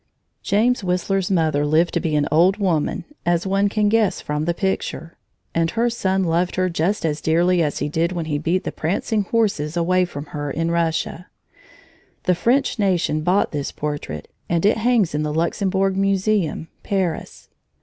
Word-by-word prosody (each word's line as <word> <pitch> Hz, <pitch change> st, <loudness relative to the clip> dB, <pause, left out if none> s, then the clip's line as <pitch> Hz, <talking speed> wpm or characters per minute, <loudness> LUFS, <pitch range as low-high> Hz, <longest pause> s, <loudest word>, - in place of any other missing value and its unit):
James 225 Hz, +3 st, +1 dB
Whistler's 185 Hz, +1 st, 0 dB
mother 160 Hz, -6 st, +1 dB
lived 155 Hz, +3 st, +2 dB
to -, -, +1 dB
be 155 Hz, -2 st, -1 dB
an 145 Hz, -1 st, +2 dB
old 175 Hz, +6 st, +4 dB
woman, 175 Hz, -7 st, 0 dB, 0.2 s
as 175 Hz, +1 st, +1 dB
one 195 Hz, +1 st, +2 dB
can 210 Hz, 0 st, +1 dB
guess 220 Hz, -1 st, +2 dB
from 150 Hz, +1 st, -3 dB
the 170 Hz, -, +1 dB
picture, 190 Hz, -3 st, -3 dB, 0.4 s
and 165 Hz, 0 st, +1 dB
her 235 Hz, +5 st, 0 dB
son 190 Hz, -4 st, 0 dB
loved 175 Hz, +1 st, 0 dB
her 185 Hz, 0 st, +1 dB
just 170 Hz, +4 st, 0 dB
as 150 Hz, -2 st, -1 dB
dearly 175 Hz, +2 st, +2 dB
as 150 Hz, -3 st, 0 dB
he 145 Hz, -, -1 dB
did 165 Hz, +3 st, 0 dB
when 170 Hz, -3 st, -3 dB
he 145 Hz, -2 st, -1 dB
beat 170 Hz, +4 st, 0 dB
the -, -, -3 dB
prancing 200 Hz, +5 st, -1 dB
horses 185 Hz, -9 st, 0 dB
away 180 Hz, +2 st, +2 dB
from 145 Hz, -4 st, -7 dB
her, 145 Hz, -1 st, -3 dB
in 165 Hz, +3 st, -1 dB
Russia. 165 Hz, +1 st, -1 dB, 1.0 s
The 180 Hz, -, +3 dB
French 235 Hz, +8 st, +1 dB
nation 180 Hz, -6 st, +1 dB
bought 180 Hz, +5 st, +2 dB
this 145 Hz, -2 st, -3 dB
portrait, 145 Hz, -, -5 dB, 0.2 s
and 170 Hz, +1 st, +1 dB
it 210 Hz, -, +4 dB
hangs 220 Hz, -6 st, +2 dB
in 150 Hz, -, 0 dB
the 150 Hz, 0 st, -1 dB
Luxembourg 190 Hz, +4 st, 0 dB
Museum, 195 Hz, -4 st, 0 dB
Paris. 185 Hz, -5 st, -3 dB
175 Hz, 175 wpm, -21 LUFS, 160-195 Hz, 1.0 s, old